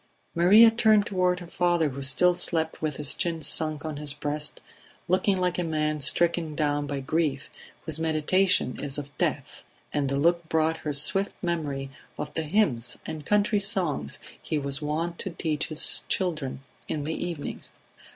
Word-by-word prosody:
Maria 205 +7 +7
turned 220 -3 +4
toward 180 -2 0
her - - -7
father 175 -2 +1
who 140 +1 -7
still 140 +7 +3
slept 165 -2 -1
with 155 -3 -2
his 150 -2 -1
chin 165 -2 -2
sunk 155 0 +1
on 155 -2 -4
his 145 -1 -1
breast, 150 0 -3 0.5
looking 190 +2 +2
like 180 -1 0
a - - 0
man 155 -2 -1
stricken 170 0 +2
down 145 -1 0
by 140 -1 -3
grief 150 0 -1 0.3
whose 160 -1 +1
meditation 160 -1 +2
is 140 0 -1
of 145 0 -7
death; - - -2 0.3
and 140 -2 0
the 140 - -1
look 170 +2 +1
brought 160 0 +1
her 150 - -4
swift 195 +8 +2
memory 145 -6 -2 0.3
of 150 0 -5
the 160 - -1
hymns 150 - 0
and 155 -2 -7
country 210 0 +2
songs 180 - -1 0.2
he 155 - -2
was 140 0 -3
wont 165 +3 -2
to - - -3
teach 160 -3 -2
his 155 -1 +2
children 150 -8 -2 0.2
in 150 - -3
the 160 +2 -3
evenings. 170 -5 -6
160 Hz, 170 wpm, -26 LUFS, 145-175 Hz, 0.5 s, Maria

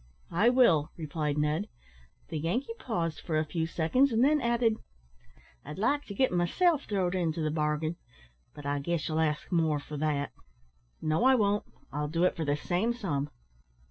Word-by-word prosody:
"I 205 +8 +4
will," 210 - +4
replied 150 -2 -2
Ned. 150 +6 0 0.6
The 160 - -3
Yankee 230 - -1
paused 165 -9 -2
for 160 -3 -1
a 155 - +1
few 160 +1 -2
seconds, 250 +13 +2
and 230 +2 +3
then 295 +1 +4
added 235 -2 +2 0.9
"I'd 150 - -8
like 285 +8 +1
to 200 - -8
git 260 +4 +2
myself 285 - +2
throwd 190 -4 0
into 170 -3 -1
the 155 - 0
bargain, 155 +1 -1 0.6
but 145 - -10
I 145 0 0
guess 165 +2 -2
ye'll 155 0 0
ask 150 +1 0
more 160 -4 +2
for 150 +1 -7
that." 145 -1 -1 0.7
"No, 155 +7 +1
I 265 +1 +6
won't; 205 -3 +1 0.3
I'll 150 +1 -1
do 165 +3 0
it 180 - +3
for 160 - -2
the 145 0 +1
same 185 +10 0
sum." 150 - -2
165 Hz, 175 wpm, -29 LUFS, 150-220 Hz, 0.9 s, I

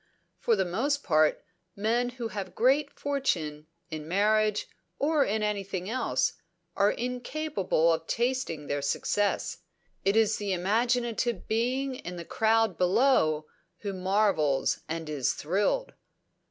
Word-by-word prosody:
For 230 - +2
the 190 -2 +1
most 275 +11 0
part, 155 -3 +3 0.3
men 230 +4 +1
who 235 -2 -3
have 200 -3 -6
great 275 +4 +3
good - - -27
fortune, 165 - -1 0.2
in 155 -1 -5
marriage, 210 +3 +2 0.3
or 295 0 +3
in 215 +1 -1
anything 195 -3 -2
else, 180 - +1 0.4
are 200 - +4
incapable 245 - 0
of 160 0 -3
tasting 240 - -1
their 145 0 -2
success. 205 +8 0 0.4
It 195 +2 +2
is 220 -1 +3
the 200 -2 -2
imaginative 235 +3 0
being 255 +4 0
in 180 -8 -7
the 170 -1 -7
crowd 220 -3 +2
below 180 - +3 0.4
who 200 -2 -3
marvels 185 -7 +1
and 165 0 -3
is 140 -4 0
thrilled. 205 - 0
205 Hz, 130 wpm, -28 LUFS, 170-240 Hz, 0.4 s, are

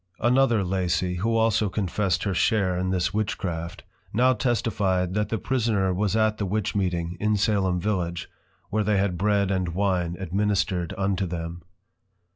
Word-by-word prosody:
Another 120 -3 +3
Lacy, 90 -1 0
who 115 +5 0
also 110 -2 +2
confessed 95 -2 -1
her 100 - -1
share 95 0 +2
in 90 +1 -1
this 90 -1 0
Witchcraft, 95 -5 -3 0.3
now 125 +4 +4
testify'd, 100 -6 0
that 105 0 0
the 115 - -1
prisoner 110 -4 0
was 100 +2 0
at 110 -1 +2
the 100 - 0
Witch 105 +1 -1
meeting, 90 -3 -1
in 105 +1 +1
Salem 95 -3 +1
Village, 90 -3 -2 0.4
where 110 0 +1
they 105 0 +2
had 95 -2 +1
Bread 100 +1 +1
and 90 -3 -1
Wine 90 -3 0
Administred 95 -1 0
unto 95 -1 0
them. 85 0 -5
95 Hz, 155 wpm, -25 LUFS, 90-105 Hz, 0.4 s, now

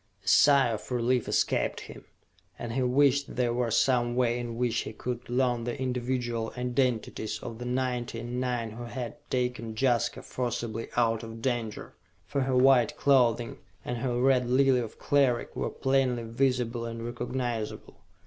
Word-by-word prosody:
A - - -18
sigh 140 -3 +6
of 110 -2 -5
relief 125 0 +1
escaped - - 0
him, - - -11 0.5
and 120 -1 -5
he 130 - 0
wished 140 +2 +2
there 120 -1 +1
were 120 -1 0
some 120 +1 +2
way 120 -1 +1
in 120 -1 -5
which 120 -2 +1
he - - -5
could 120 +2 -5
learn 120 -1 +1
the 120 +3 -4
individual 125 -3 -2
identities 125 -3 -1
of 115 +1 -8
the 125 - -5
ninety 125 -2 -2
and 120 +2 -4
nine 120 -3 -2
who 120 +2 -7
had 120 0 -6
taken 125 -3 -2
Jaska 120 -1 +1
forcibly 115 -2 -3
out 115 -2 +2
of 115 0 -9
danger! 120 -4 -2 0.3
For 135 +9 -1
her 130 -1 +1
white 125 -3 +4
clothing, 120 -4 +2 0.3
and 120 -1 -3
her 120 -1 -1
Red 130 -1 +3
Lily 130 0 +4
of 115 -3 -5
Cleric 135 -4 +1
were - - -1
plainly 130 -3 +1
visible 120 0 0
and 115 0 -5
recognizable! 120 -2 -4
120 Hz, 160 wpm, -28 LUFS, 115-130 Hz, 0.5 s, sigh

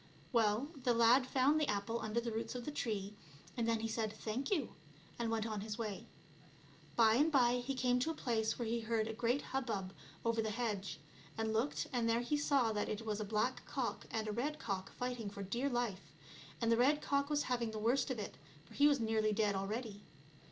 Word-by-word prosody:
Well, 225 +4 +3
the 245 -1 +2
lad 240 +3 +5
found 275 +4 +3
the 300 - +2
apple 210 +3 -1
under 220 +2 0
the 235 0 -3
roots 225 +3 -3
of 245 - -5
the 300 - -3
tree, 210 -7 -2 0.4
and 235 -2 0
then 230 -1 +1
he 225 - -1
said 220 -1 -1
" - - -15
thank 230 +5 -1
you," 315 - 0 0.5
and 235 -1 0
went 225 -1 0
on 215 -3 -3
his 210 0 -4
way. 215 -4 -4 0.9
By 225 -2 +6
and 295 +7 +4
by 250 -4 +4
he 260 +2 -3
came 250 -1 +2
to 255 - 0
a 325 - -2
place 225 -5 0
where 235 - -2
he 235 +1 0
heard 225 -1 0
a 225 - -3
great 240 +5 0
hubbub 220 -8 -2 0.3
over 230 -1 +2
the 220 - -1
hedge; 210 -7 -2 0.4
he 225 - 0
looked 220 +5 0
and 235 -2 +1
there 230 +1 +3
he 245 +5 0
saw 280 -5 +2
that 210 -1 -1
it 215 +1 -3
was 215 -1 -1
a - - -1
black 215 +5 0
cock 260 -4 -3
and 220 -1 -2
a - - -1
red 280 +8 -1
cock 195 -6 -3
fighting 245 -4 -3
for 200 0 -6
dear 235 +9 -1
life, 220 - -2 0.5
and 230 -1 +2
the 230 - +5
red 290 +5 +4
cock 280 0 +1
was 295 -1 +2
having 240 -2 0
the 220 - -5
worst 240 +6 +2
of 260 - -1
it, 210 - -6 0.3
for - - -16
it 290 - +8
was 285 -2 +4
nearly 220 -1 +2
dead 210 -1 +2
already. 205 +2 -3
230 Hz, 225 wpm, -36 LUFS, 215-250 Hz, 0.9 s, it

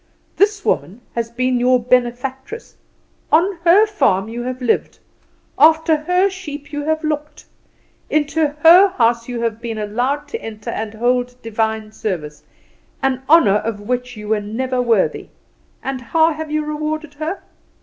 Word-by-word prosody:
This 410 0 +1
woman 205 +7 -1
has 230 -1 -2
been 255 +1 0
your 250 +1 +3
benefactress; 250 - -2 0.6
on 350 +3 +3
her 380 +6 +6
farm 220 - +1
you 235 +1 -5
have 255 +1 -4
lived; 245 -3 0 0.6
after 320 +2 +5
her 360 +5 +2
sheep 300 -7 -8
you 290 - -2
have 315 +1 -1
looked; 300 -1 -4 0.6
into 305 +1 +1 0.2
her 355 +5 +9
house 235 0 +2
you 240 -1 -4
have 230 -1 -2
been 230 -2 -4
allowed 245 +8 -2
to - - -5
enter 215 -2 -7
and 220 0 -5
hold 245 +2 0
Divine 220 -1 -2
service 155 -9 -5 0.6
an 260 -1 0
honour 230 -11 +6
of 215 -1 -4
which 245 +2 -3
you 210 0 -8
were 215 -1 +1
never 250 +5 -2
worthy; 230 -5 +1 0.6
and 265 -1 -4
how 320 +6 +2
have 310 0 -6
you 305 0 -1
rewarded 305 0 -4
her? 315 +6 -5
255 Hz, 150 wpm, -19 LUFS, 230-310 Hz, 0.6 s, her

